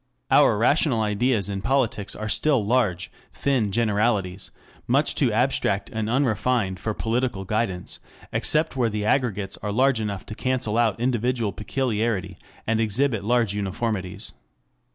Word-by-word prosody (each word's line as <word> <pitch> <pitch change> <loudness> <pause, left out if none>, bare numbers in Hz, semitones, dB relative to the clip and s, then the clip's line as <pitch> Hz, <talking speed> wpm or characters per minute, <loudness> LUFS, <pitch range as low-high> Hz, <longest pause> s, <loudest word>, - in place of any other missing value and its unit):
Our - - +5
rational 125 +1 +2
ideas 105 0 +1
in 100 -1 -4
politics 120 -4 0
are 110 - -5
still 130 0 +2
large, 105 -7 +1 0.2
thin 130 -7 0
generalities, 105 -3 0 0.4
much - - +3
too - - +2
abstract 100 0 0
and 110 -1 -2
unrefined 120 -6 +1
for 110 +2 -3
practical 115 -4 -1
guidance, 95 -3 -2 0.3
except 155 -1 +2
where 120 -3 +1
the 105 -1 -3
aggregates 105 -5 0
are 105 - -3
large 130 +1 +2
enough 100 -3 -4
to - - -7
cancel 125 -2 -1
out 115 -3 +2
individual 120 -2 0
peculiarity 105 -4 -2 0.3
and 115 0 +1
exhibit 115 0 +1
large 115 -2 +2
uniformities. 100 -1 -3
110 Hz, 135 wpm, -24 LUFS, 100-125 Hz, 0.4 s, Our